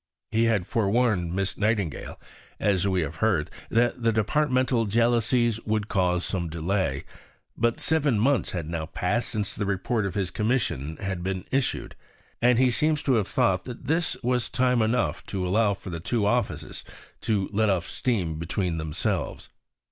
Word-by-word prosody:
He 115 Hz, +1 st, +3 dB
had 110 Hz, -6 st, +2 dB
forewarned 105 Hz, -5 st, +1 dB
Miss 95 Hz, 0 st, -2 dB
Nightingale, 105 Hz, -7 st, -1 dB, 0.4 s
as 100 Hz, -2 st, +2 dB
we 95 Hz, -2 st, +1 dB
have 80 Hz, 0 st, -4 dB
heard, 100 Hz, -9 st, +1 dB, 0.2 s
that 120 Hz, +1 st, +2 dB
departmental 125 Hz, +2 st, +2 dB
jealousies 115 Hz, +1 st, +2 dB
would 110 Hz, -1 st, -1 dB
cause 90 Hz, -2 st, +1 dB
some 85 Hz, -4 st, -2 dB
delay; 85 Hz, -3 st, -1 dB, 0.5 s
but 120 Hz, 0 st, +1 dB
seven 150 Hz, -7 st, +2 dB
months 135 Hz, +3 st, +2 dB
had 85 Hz, -4 st, -4 dB
now 80 Hz, -1 st, -3 dB
passed 100 Hz, +8 st, -1 dB
since 105 Hz, -5 st, -2 dB
the 105 Hz, -, -3 dB
Report 100 Hz, +2 st, 0 dB
of 100 Hz, -, -6 dB
his 95 Hz, -4 st, -1 dB
Commission 105 Hz, -, -1 dB
had 95 Hz, -3 st, -3 dB
been 95 Hz, 0 st, -3 dB
issued, 135 Hz, -1 st, -1 dB, 0.5 s
and 120 Hz, 0 st, +5 dB
he 130 Hz, 0 st, +4 dB
seems 150 Hz, +3 st, +1 dB
to 135 Hz, -, +2 dB
have 110 Hz, -5 st, +2 dB
thought 95 Hz, -1 st, +1 dB
that 125 Hz, -2 st, -8 dB
this 160 Hz, -3 st, +1 dB
was 125 Hz, 0 st, +1 dB
time 125 Hz, -1 st, +2 dB
enough 115 Hz, +3 st, 0 dB
to 95 Hz, -2 st, -2 dB
allow 100 Hz, +2 st, +2 dB
for 95 Hz, -, -9 dB
the 85 Hz, -, -4 dB
two 110 Hz, +5 st, 0 dB
offices 105 Hz, -, -1 dB, 0.4 s
to 100 Hz, -4 st, 0 dB
let 110 Hz, +1 st, +2 dB
off 90 Hz, -3 st, 0 dB
steam 90 Hz, -11 st, -1 dB
between 85 Hz, 0 st, -2 dB
themselves. 80 Hz, -1 st, -2 dB
105 Hz, 165 wpm, -26 LUFS, 90-120 Hz, 0.5 s, and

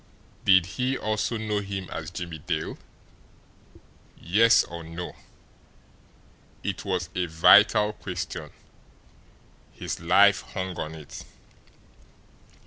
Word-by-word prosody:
Did 95 Hz, -3 st, +6 dB
he 125 Hz, +8 st, -2 dB
also 110 Hz, +2 st, -1 dB
know 105 Hz, -1 st, -2 dB
him 100 Hz, -2 st, -5 dB
as 80 Hz, 0 st, -5 dB
Jimmie 85 Hz, -2 st, -6 dB
Dale? 75 Hz, +1 st, -4 dB, 1.4 s
Yes, 110 Hz, +7 st, +4 dB
or 85 Hz, 0 st, -8 dB
no? 85 Hz, +2 st, -7 dB, 1.5 s
It 100 Hz, -2 st, -3 dB
was 90 Hz, -4 st, -2 dB
a 90 Hz, -1 st, -1 dB
vital 105 Hz, +6 st, +5 dB
question. 90 Hz, -5 st, -6 dB, 1.2 s
His -, -, -6 dB
life 100 Hz, +4 st, +5 dB
hung 95 Hz, -1 st, -6 dB
on 80 Hz, +1 st, -5 dB
it. 75 Hz, -2 st, -10 dB
90 Hz, 100 wpm, -26 LUFS, 85-105 Hz, 1.5 s, Did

